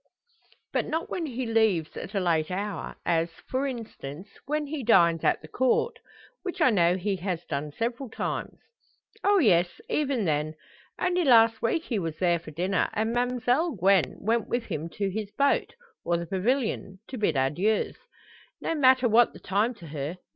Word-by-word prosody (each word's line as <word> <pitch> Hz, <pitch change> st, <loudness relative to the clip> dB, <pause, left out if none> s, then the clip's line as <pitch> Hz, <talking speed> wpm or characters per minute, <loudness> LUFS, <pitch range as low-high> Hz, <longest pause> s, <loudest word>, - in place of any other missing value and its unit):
"But -, -, 0 dB
not 325 Hz, +2 st, -3 dB
when 335 Hz, -3 st, -2 dB
he 255 Hz, -1 st, -3 dB
leaves 220 Hz, -8 st, +1 dB
at 200 Hz, +4 st, -7 dB
a -, -, +2 dB
late 165 Hz, -4 st, +1 dB
hour 195 Hz, 0 st, -4 dB
as, 165 Hz, 0 st, +1 dB, 0.2 s
for 265 Hz, +2 st, -1 dB
instance, 205 Hz, -, -7 dB, 0.2 s
when 300 Hz, +1 st, -1 dB
he 290 Hz, -1 st, -4 dB
dines 170 Hz, -7 st, +4 dB
at -, -, +2 dB
the -, -, -9 dB
Court; 260 Hz, -, +1 dB, 0.4 s
which 365 Hz, -2 st, -5 dB
I 255 Hz, -, +5 dB
know 175 Hz, -3 st, +3 dB
he 195 Hz, +1 st, -1 dB
has 180 Hz, -2 st, -3 dB
done 145 Hz, 0 st, -3 dB
several 235 Hz, -, -3 dB
times?" -, -, -4 dB, 0.7 s
"Oh, 405 Hz, 0 st, +4 dB
yes; 175 Hz, -, +3 dB
even 270 Hz, -7 st, 0 dB
then. 155 Hz, 0 st, 0 dB, 0.4 s
Only 360 Hz, 0 st, +1 dB
last 225 Hz, -5 st, +5 dB
week 275 Hz, +8 st, 0 dB
he 230 Hz, -5 st, -1 dB
was 165 Hz, -3 st, -4 dB
there 175 Hz, -2 st, +2 dB
for 165 Hz, -, -11 dB
dinner; 180 Hz, +5 st, 0 dB
and 220 Hz, +2 st, 0 dB
Ma'mselle 250 Hz, +4 st, +1 dB
Gwen 190 Hz, -1 st, +3 dB
went 225 Hz, +2 st, 0 dB
with 240 Hz, 0 st, -1 dB
him 160 Hz, -3 st, -4 dB
to 200 Hz, +3 st, -2 dB
his 210 Hz, +1 st, -4 dB
boat, 280 Hz, +10 st, +2 dB, 0.3 s
or 170 Hz, 0 st, +1 dB
the 170 Hz, -, -4 dB
pavilion 195 Hz, +1 st, -1 dB
to 260 Hz, -, -5 dB
bid 210 Hz, -, +1 dB
adieus. 170 Hz, +12 st, +1 dB, 0.6 s
No -, -, -2 dB
matter 260 Hz, -4 st, +5 dB
what 235 Hz, +1 st, +4 dB
the -, -, -12 dB
time 210 Hz, +6 st, 0 dB
to 170 Hz, -6 st, -12 dB
her. 150 Hz, +3 st, -4 dB
210 Hz, 175 wpm, -27 LUFS, 170-250 Hz, 0.7 s, I